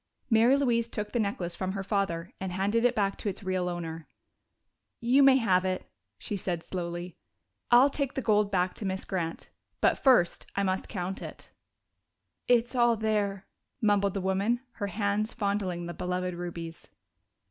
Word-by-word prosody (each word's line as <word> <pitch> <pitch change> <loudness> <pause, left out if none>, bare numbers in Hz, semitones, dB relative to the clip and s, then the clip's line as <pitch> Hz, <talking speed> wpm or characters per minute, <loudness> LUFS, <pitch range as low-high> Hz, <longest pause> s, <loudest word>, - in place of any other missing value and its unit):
Mary 230 +5 +5
Louise 235 -4 +1
took 210 -2 -4
the 240 - 0
necklace 195 -5 -1
from 185 +2 -3
her 195 -1 -3
father 190 -4 -1
and 190 -1 -4
handed 200 +5 +1
it 245 0 +3
back 200 -2 0
to 210 - -2
its 200 +1 -6
real 185 -1 -1
owner. 165 -2 -5 0.9
"You 250 +4 +4
may 270 -1 +7
have 190 -8 +3
it," 185 -1 -3 0.3
she 210 - -4
said 175 -3 -3
slowly. 175 -1 -5 0.5
"I'll 250 +4 +6
take 275 -2 -2
the 265 - -1
gold 210 -2 +3
back 180 -2 +1
to 210 - -5
Miss 190 0 -2
Grant. 170 -4 -4 0.3
But - - +3
first 240 -11 +3
I 200 - +1
must 190 0 -1
count 185 -1 -4
it." - - -9 1.0
"It's 240 0 +3
all 240 -2 +3
there," 205 -2 -1 0.3
mumbled 205 -3 +2
the 195 - -1
woman, 200 +6 +1 0.2
her 205 - -2
hands 205 +2 -1
fondling 200 -5 -1
the 175 - -5
beloved 180 +1 -2
rubies. 170 -1 -7
195 Hz, 170 wpm, -29 LUFS, 180-225 Hz, 1.0 s, may